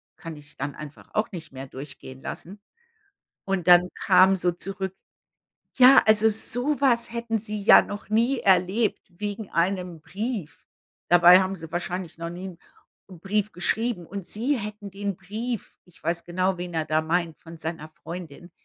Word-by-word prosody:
kann 165 -1 -9
ich 150 0 -13
dann 145 +1 -4
einfach 150 -1 -11
auch 215 - 0
nicht 165 -5 -9
mehr 135 0 -8
durchgehen 130 -1 -10
lassen. 195 +4 -8 0.9
Und 195 -3 -2
dann 180 0 +7
kam 190 +1 +5
so 175 -1 0
zurück: 190 +1 -4 0.8
„Ja, 260 +1 +8
also, 215 0 +5
so 245 +6 +1
was 240 -4 +2
hätten 235 -1 -2
sie 210 -1 -5
ja - - +8
noch 205 0 -8
nie 235 +5 +2
erlebt 195 +3 +2 0.2
wegen 205 0 -5
einem 180 -1 -1
Brief.“ 205 - -5 0.4
Dabei 175 +1 +8
haben 190 0 -1
sie 165 -3 -10
wahrscheinlich 175 0 -4
noch 170 0 -5
nie 175 +2 -8
'n 180 - -10 0.5
'n 180 -3 -12
Brief 205 +3 -1
geschrieben. 220 +1 0
Und 195 +1 -7
sie 255 +7 0
hätten 210 -1 -7
den 200 0 -4
Brief 215 +5 -6
ich 180 - -22
weiß 170 +1 -1
genau, 185 +2 0
wen 175 -1 -6
er 160 -1 -1
da 155 0 +1
meint 165 0 -1
von 165 0 -12
seiner 160 -1 -5
Freundin. 170 +1 -10
185 Hz, 165 wpm, -25 LUFS, 170-210 Hz, 0.9 s, Ja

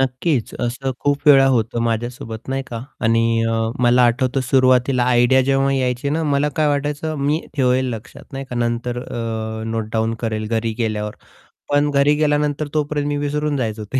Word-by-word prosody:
नक्कीच. 130 0 0
असं 125 +3 -2
खूप 145 +2 -1
वेळा 135 -2 +7
होतं 115 -2 0
माझ्यासोबत 115 0 -4
नाही 135 0 -1
का 115 -1 -6 0.2
आणि 115 0 +2
अ, - - 0 0.3
मला 120 +1 +5
आठवतं 130 +3 +1
सुरुवातीला 130 0 +3
आयडिया 125 +1 +4
जेव्हा 135 +1 +2
यायची 130 +1 -1
ना, 160 +2 0
मला 145 -1 +1
काय 155 -1 +2
वाटायचं 145 +2 -2
मी 145 +4 0 0.2
ठेवेल 130 -1 +2
लक्षात, 130 +5 -11
नाही 135 0 -5
का, 125 - -4
नंतर 120 +1 -2
अ, 110 -1 -4
नोट 110 -1 -3
डाउन 110 0 0
करेल 110 -2 -2
घरी 115 0 -1
गेल्यावर. 105 -2 -2 0.6
पण 145 +1 +3
घरी 140 +1 +3
गेल्यानंतर 150 0 +1
तोपर्यंत 150 -1 -1
मी 145 - -1
विसरून 145 0 -1
जायचो 110 -4 -3
ते 130 - +2
130 Hz, 170 wpm, -20 LUFS, 115-145 Hz, 0.6 s, वेळा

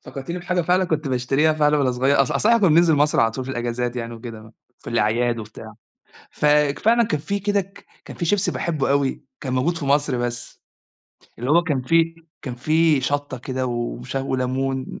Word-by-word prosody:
فكرتيني 140 +6 -6
بحاجة 180 0 -1
فعلًا 180 +3 +2
كنت 155 -4 -2
باشتريها 135 +5 +1
فعلًا 150 -1 +2
وأنا 130 -2 +2
صغيّر، 135 +3 +3
أص 130 - -2
أصل 215 - +1
احنا 235 0 +5
كنا 195 - +4
بننزل 165 +1 +5
مصر 145 -3 +2
على 115 0 +3
طول 130 +3 -5
في 130 - -6
الأجازات 120 0 -3
يعني 115 0 -5
وكده، 110 -1 -10 0.3
في - - -9
الأعياد 115 +1 +1
وبتاع، 110 0 -10 0.6
فك 150 -1 +2
فعلًا 235 +2 +3
كان 150 -8 -2
في 200 +5 -2
كده 205 +1 +1
ك 195 +1 -13 0.2
كان - - -10
في 170 - -3
شيبسي 200 +3 +1
باحبه 155 -6 -1
أوي، 140 -1 0 0.2
كان 135 -3 -4
موجود 145 +7 0
في - - -5
مصر 140 -2 +1
بس، 120 0 -5 0.8
اللي 125 +4 -3
هو 170 +3 +5
كان 145 -7 -1
فيه 165 +4 +2 0.3
كان 130 -4 -5
فيه 155 +3 +2
شطة 145 -1 -2
كده 130 +1 -3
ووش 120 +1 -4
وليمون. 130 0 -2
140 Hz, 195 wpm, -22 LUFS, 125-160 Hz, 0.8 s, احنا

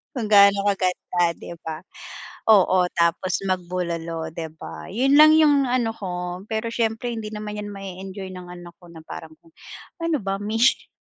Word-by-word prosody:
Kung 235 -4 -2
ga'no 200 -1 +6
kaganda, 180 -2 0
'di - - -9
ba? 160 -1 -5 0.7
Oo, 185 -3 +5
tapos 170 +2 +1
magbulalo, 170 -3 -3
'di 165 -1 -5
ba? - - -8
'Yon 265 +7 +2
lang 310 0 +9
'yong 295 -3 +5
ano 245 -2 +1
ko. 180 -2 -5
Pero 220 +1 -2
siyempre 230 +1 -1
hindi 225 -2 -5
naman 210 0 -5
'yan 205 - -5
ma-e-enjoy 190 0 -7
ng 180 -1 -9
anak 175 -1 -10
ko 175 - -16
na 165 -1 -11
parang - - -9
kung 330 - -22 0.5
ano 330 -2 +1
ba 195 0 -1
mish 225 +4 +2
195 Hz, 165 wpm, -23 LUFS, 180-225 Hz, 0.7 s, lang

